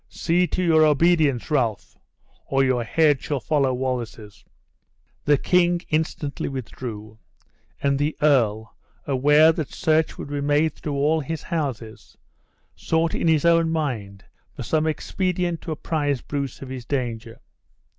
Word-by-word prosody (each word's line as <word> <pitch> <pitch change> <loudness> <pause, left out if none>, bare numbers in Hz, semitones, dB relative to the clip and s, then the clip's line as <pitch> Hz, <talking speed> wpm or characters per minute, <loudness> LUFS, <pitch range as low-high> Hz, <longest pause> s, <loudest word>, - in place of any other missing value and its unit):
See 175 +2 +1
to 185 - -2
your 160 -2 +4
obedience, 155 -3 +2
Ralph, 115 -8 -1 0.5
or 135 0 +2
your 130 -2 +1
head 145 +3 +2
shall 145 -2 -2
follow 140 -1 +1
Wallace's." 120 -5 -4 0.8
The 145 -1 +4
king 175 +2 +2
instantly 155 -2 -2
withdrew, 110 -4 -7 0.6
and 140 -1 +1
the 150 +2 -1
earl, 110 -7 +1 0.3
aware 145 +4 +5
that 155 -3 -4
search 160 0 +1
would - - -7
be 145 -1 -3
made 145 +2 +2
through 145 -2 -5
all 150 +3 +2
his 155 +1 -5
houses, 135 - -5 0.6
sought 160 0 0
in - - -1
his 160 -1 +3
own 165 -1 +4
mind 115 -12 -3 0.3
for - - -6
some 155 0 0
expedient 175 +2 -2
to 165 - -6
apprise 145 -3 -2
Bruce 140 -3 -5
of 130 - -9
his 130 -2 -6
danger. 120 -3 -4
145 Hz, 140 wpm, -23 LUFS, 130-160 Hz, 0.8 s, aware